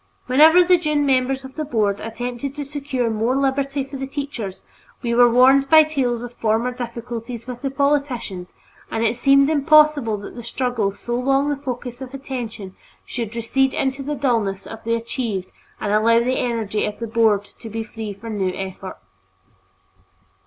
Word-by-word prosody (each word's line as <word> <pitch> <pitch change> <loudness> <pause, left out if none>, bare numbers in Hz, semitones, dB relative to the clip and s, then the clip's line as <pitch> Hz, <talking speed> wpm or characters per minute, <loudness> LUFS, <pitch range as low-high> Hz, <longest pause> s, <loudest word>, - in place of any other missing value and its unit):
Whenever 315 +7 +6
the 360 0 +4
Dunne 300 -3 +1
members 265 0 +1
of 265 - -10
the 310 - -3
Board 215 -8 0
attempted 245 +4 -5
to 290 -1 -4
secure 275 -3 -2
more 225 +4 0
liberty 275 0 0
for 275 +1 -8
the 270 0 -4
teachers, 270 -9 -5 0.4
we 235 -1 0
were 240 0 +6
warned 265 +3 +5
by 315 -1 +8
tales 255 -6 -1
of 245 0 -8
former 230 +2 0
difficulties 235 -1 -6
with 245 -1 -7
the 275 - -1
politicians, 270 -10 -1 0.4
and 225 - -1
it 230 +1 +1
seemed 275 +2 +4
impossible 300 -6 +4
that 200 - -9
the 240 - -8
struggle 235 -3 -1
so 240 +4 -6
long 270 +3 +1
the 290 - 0
focus 250 -2 -6
of 265 +1 -7
attention 235 -8 -6 0.3
should 230 -2 -5
recede 265 +3 +1
into 270 0 -1
the 295 +2 -3
dullness 225 -8 0
of 225 0 -9
the 230 0 +1
achieved 230 -5 -4 0.3
and 205 -1 -1
allow 225 +2 +4
the 255 +2 0
energy 225 -4 -1
of 210 - -3
the 230 - -4
Board 220 -3 +2 0.2
to 225 - -8
be 225 +1 -4
free 220 -1 -7
for 200 +3 -10
new 195 -3 -1
effort. 190 0 -6
245 Hz, 175 wpm, -21 LUFS, 225-275 Hz, 0.4 s, by